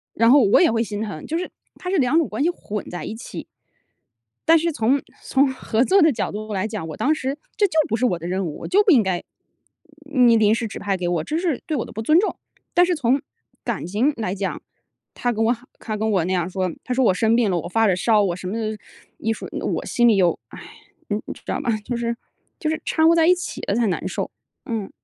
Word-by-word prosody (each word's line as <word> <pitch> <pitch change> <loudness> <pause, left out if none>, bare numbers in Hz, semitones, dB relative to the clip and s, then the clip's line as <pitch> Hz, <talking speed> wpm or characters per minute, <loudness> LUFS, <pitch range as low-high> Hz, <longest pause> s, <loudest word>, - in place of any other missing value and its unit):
然 230 +1 +4
后 275 +1 +7
我 200 - +5
也 345 - +5
会 225 0 +1
心 210 -1 -5
疼， 205 -8 -5
就 325 - -2
是 365 - -3 0.3
它 360 - -6
是 380 - +1
两 270 +1 +3
种 330 - +3
关 - - -2
系 335 - +3
混 210 - -5
在 175 - -6
一 220 - -5
起。 230 - -8 1.0
但 330 - +7
是 335 +1 0
从 265 0 +1 0.2
从 270 0 +2
合 240 -3 0
作 385 +7 +4
的 320 - +6
角 230 - -2
度 215 +1 -5
来 190 0 -1
讲， 210 -7 -5
我 155 - -6
当 300 - +2
时 275 -2 -3 0.2
这 410 - +4
就 360 - -12 0.2
不 225 - +1
是 255 - +1
我 185 -8 +1
的 170 +1 -7
任 190 +1 -1
务， 155 - -5
我 - - -7
就 400 +3 +5
不 410 - +4
应 250 -8 +6
该 190 -2 -1 0.9
你 250 -5 +5
临 215 0 +4
时 230 -1 -2
指 - - -7
派 200 -1 -1
给 180 -1 -4
我， 175 -2 0
这 310 - -2
是 335 -6 -1
对 315 - -1
我 250 - -2
的 - - -11
不 220 - -5
尊 305 +8 +4
重。 420 - -2 0.4
但 355 - +5
是 355 0 +1
从 265 -2 +1 0.4
感 235 -8 -2
情 215 - +1
来 215 -5 -2
讲， 195 -1 -3 0.5
他 245 -1 -1
跟 220 0 0
我 230 +2 +3 0.3
他 215 -2 -4
跟 220 +1 0
我 190 -5 +2
那 180 - -2
样 180 -1 0
说， 185 -1 -1
他 255 - -1
说： 260 +1 +2
“我 205 - +4
生 220 +4 +2
病 230 -4 +2
了， 175 - +1
我 - - -6
发 225 +4 +2
着 190 - +3
烧， 215 +2 +3
我 185 -3 0
什 180 - -6
么” 195 - -3 0.6
一 225 - 0
说， - - -8
我 - - -3
心 240 -1 +3
里 225 - +5
又 180 -3 +2
唉， - - -11 0.5
你 205 0 0
你 - - -5
知 - - -17
道 - - -2
吗？ 270 - -2
就 240 +2 -3
是 235 0 -1 0.4
就 310 - -2
是 315 - -2
掺 320 - +2
和 - - +6
在 330 -1 +4
一 360 - +6
起 360 - -6
了 200 - +1
才 235 0 +2
难 185 -1 -2
受， 185 - -3 0.3
嗯。 220 -4 -4
225 Hz, 280 characters per minute, -22 LUFS, 200-285 Hz, 1.0 s, 后